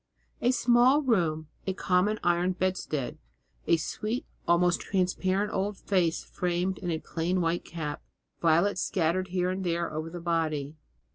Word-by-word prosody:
A 240 - +3
small 255 +3 +4
room, 165 - +1 0.2
a 190 - +1
common 195 +3 +1
iron 175 +1 +2
bedstead, 180 -7 -2 0.5
a 170 - +5
sweet, 215 +8 -3 0.2
almost 175 0 +3
transparent 190 +2 0
old 200 +1 -1
face 180 -5 +1
framed 180 +1 -1
in 175 - -4
a 165 - 0
plain 170 +3 -1
white 170 0 0
cap, 150 -3 -5 0.4
violets 175 +4 +3
scattered 185 +1 0
here 180 0 0
and 190 +1 -3
there 170 -2 -1
over 155 +1 -3
the 175 +1 -7
body. 160 -4 -1
180 Hz, 145 wpm, -28 LUFS, 165-190 Hz, 0.5 s, a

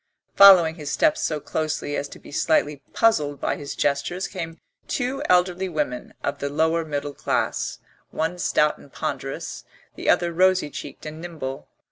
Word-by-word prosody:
Following 180 -5 +8
his 150 -3 -5
steps 315 -1 +2
so 155 -2 -1
closely 155 -1 -2
as 140 - -2
to - - -11
be - - -14
slightly 150 -1 +1
puzzled 150 - +2
by - - -1
his 145 -1 -6
gestures 145 +6 0
came 165 -4 -6 0.3
two 265 +1 -2
elderly 180 +1 +3
women 150 -7 -3
of 140 - -2
the 140 - -2
lower 160 +3 +1
middle 145 -2 -4
class, - - -1 0.3
one 165 +3 -2
stout 150 -2 +2
and 140 - -16
ponderous, - - -4 0.3
the - - -3
other 170 -1 +3
rosy 185 -3 +3
cheeked - - -8
and 155 +1 -7
nimble. 155 -6 -6
160 Hz, 160 wpm, -24 LUFS, 145-180 Hz, 0.3 s, Following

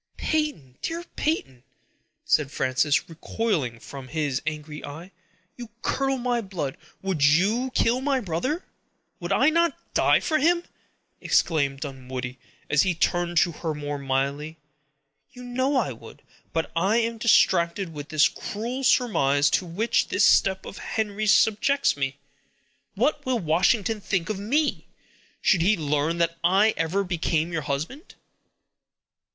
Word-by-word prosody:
"Peyton, 295 - -2
dear 335 +1 -3
Peyton," 135 - -2 0.6
said 145 -3 +2
Frances, 140 +1 +1
recoiling 160 - -2
from 135 +3 -10
his 145 -2 -2
angry 150 -1 -5
eye, 165 +6 -9 0.5
"you 240 -2 -8
curdle 270 0 0
my 245 -1 0
blood—would 180 -1 -4
you 200 - +3
kill 240 +3 +2
my 275 -1 +1
brother?" 250 - -2 0.5
"Would - - -5
I 310 - +4
not 335 +1 +2 0.2
die - - +4
for 310 -2 0
him!" 340 +3 +3 0.6
exclaimed 140 -4 +1
Dunwoodie, 130 -2 -6 0.3
as 150 -1 +3
he 185 -2 +1
turned 175 +1 0
to 170 - +4
her 160 -1 -4
more 145 -1 -4
mildly. 140 +3 -2 0.8
"You 250 - -11
know 260 +3 -1
I 260 - +1
would; - - -13 0.3
but 165 0 -2
I 195 +7 +2
am 230 -1 -1
distracted 175 -5 +3
with 145 -1 -8
the 155 -1 +4
cruel 240 +6 -5
surmise 145 - +3
to 180 - +1
which 205 +8 0
this - - +3
step 190 -1 +3
of - - -8
Henry's 215 -1 -1
subjects 225 +8 +3
me. 135 -1 -3 0.8
What 305 - +1
will 255 -1 0
Washington 200 +4 +1
think 190 0 -1
of 200 - -4
me, 285 +9 0 0.6
should 180 - +4
he 200 +5 +3
learn 150 +1 0
that 170 0 0
I 195 +5 +4
ever 170 +5 0
became 170 -2 -1
your 165 - -1
husband?" 155 - -5
175 Hz, 140 wpm, -25 LUFS, 150-230 Hz, 0.8 s, I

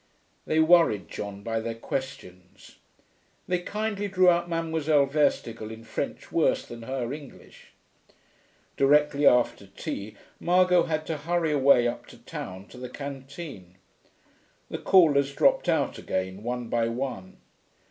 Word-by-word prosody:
They 155 - +2
worried 160 - +4
John 100 -1 -7
by 115 0 -1
their 115 0 -4
questions. 90 -8 -7 0.7
They 180 -1 +1
kindly 205 +2 -3
drew 185 -2 +4
out 175 0 0
Mademoiselle 160 -3 +1
Verstigel, 120 -6 0
in 110 0 -9
French - - -5
worse - - +2
than 120 0 -10
her 125 +1 -3
English. 145 -3 -13 1.0
Directly 145 +1 +4
after 120 -5 +3
tea 100 +2 -6 0.2
Margot 180 0 +4
had 155 -1 -2
to 160 -1 -3
hurry 165 +1 0
away 135 -4 +5
up 120 - -5
to - - -14
town 95 +2 -8
to 125 - -12
the 125 0 -6
canteen. 135 - -8 1.0
The - - -4
callers 140 -7 +4
dropped - - +3
out - - 0
again, 95 +1 -3
one 120 +1 -4
by 115 0 0
one. 115 -6 -5
135 Hz, 135 wpm, -26 LUFS, 115-160 Hz, 1.0 s, away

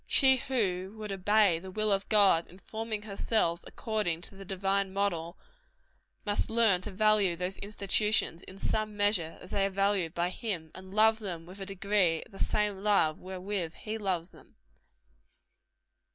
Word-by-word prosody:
She 265 -2 +6
who 205 -7 -1
would 210 -1 -6
obey 195 -2 +3
the 190 +2 -10
will 215 +2 0
of 195 0 0
God 195 -6 +5
in 180 - -16
forming 220 +1 -5
herself 200 -4 0
according 210 -7 -2
to 195 - -6
the 195 - -10
divine 195 0 -1
mode, 180 -4 -2 0.9
must 205 -1 0
learn 225 -5 +4
to 200 - -4
value 205 -2 +3
those 180 +2 -3
institutions, 205 -3 +1
in 190 - -11
some 215 +1 -2
measure, 205 -6 +1
as 180 - -13
they 195 -1 +1
are - - -4
valued 195 -3 0
by 175 +1 0
Him, 180 -8 -4
and 185 0 -11
love 220 +2 +4
them 175 -6 -6
with 185 +3 -12
a 195 - -6
degree 195 -4 +1
of - - -21
the 195 - -12
same 205 -2 0
love 195 -7 +2
wherewith 185 -2 -4
He 220 +1 -6
loves 185 -4 -1
them. - - -19
195 Hz, 165 wpm, -30 LUFS, 180-210 Hz, 0.9 s, She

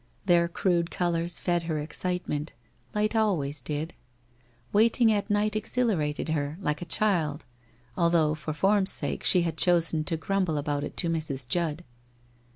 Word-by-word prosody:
Their 170 -2 +4
crude 170 -1 0
colours 170 -1 0
fed 175 -1 0
her 155 - 0
excitement 155 0 -3 0.2
— 120 - -32
light 210 +2 0
always 155 - 0
did. 150 +5 -4 0.8
Wait 225 +4 +3
ing 230 -2 +5
at 205 0 -1
night 210 +1 +1
exhilarated 210 -10 -1
her, 150 0 -2
like 150 -5 -2
a - - -4
child, 165 -6 0 0.5
although 170 -3 +3
for 155 0 -5
form's 195 +5 +2
sake - - -1
she 180 -2 +4
had 165 -2 -3
chosen 165 -3 +3
to 165 -1 0
grumble 185 -2 -1
about 145 0 -2
it - - -7
to 170 - +1
Mrs. 150 -6 -3
Judd. 170 +1 -1
170 Hz, 160 wpm, -27 LUFS, 150-195 Hz, 0.8 s, ing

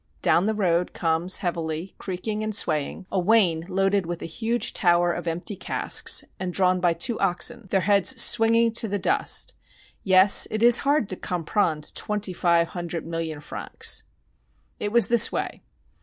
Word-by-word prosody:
Down 180 +4 +2
the 220 - -1
road 180 -4 -1
comes 165 +2 +1
heavily, 165 +1 -4
creaking 210 +3 -5
and 215 -1 -1
swaying, 155 +2 -1
a 190 - 0
wain 180 -5 +2
loaded 195 -1 0
with 175 -1 -6
a - - -5
huge 225 +7 -2
tower 175 -1 +1
of - - -7
empty 175 +5 -3
casks 185 - 0
and 185 -1 -4
drawn 185 0 +1
by 175 -1 +1
two 220 +8 -1
oxen, 200 +4 -1
their 190 0 +1
heads 205 +6 +3
swinging 230 0 +3
to 225 0 -2
the 205 0 -2
dust. 190 - -1 0.5
Yes, 190 +1 +5
it 220 +1 -3
is 240 0 +7
hard 285 -5 0
to 185 - 0
comprendre 165 -3 -2
twenty 210 -3 -3
five 170 -1 +1
hundred 175 -2 -6
million 165 -2 -5
francs. - - -2 0.8
It 205 - -3
was 235 0 +5
this 235 -2 +5
way. - - -5
185 Hz, 165 wpm, -23 LUFS, 170-215 Hz, 0.8 s, is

